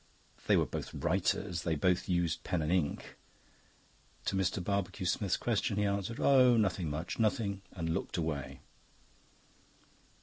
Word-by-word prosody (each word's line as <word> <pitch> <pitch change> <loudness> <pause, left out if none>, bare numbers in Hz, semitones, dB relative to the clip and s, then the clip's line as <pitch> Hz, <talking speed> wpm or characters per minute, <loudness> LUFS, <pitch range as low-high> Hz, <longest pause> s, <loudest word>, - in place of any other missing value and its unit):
They - - +5
were - - +3
both - - -6
writers, 85 -1 0
they 80 -2 0
both 90 +5 +1
used 85 -3 0
pen 90 -4 -1
and 75 - -1
ink. 90 -6 -1 1.1
To - - 0
Mr. 95 -1 0
Barbecue 100 -1 -2
Smith's 95 +1 +1
question 110 -2 0
he 105 - +2
answered, 100 +3 -2
"Oh, 125 -3 +6
nothing 95 -6 +1
much, 80 +8 -4
nothing," 105 -3 0
and 80 -3 -2
looked - - -3
away. 80 -5 -3
95 Hz, 140 wpm, -32 LUFS, 85-105 Hz, 1.1 s, Oh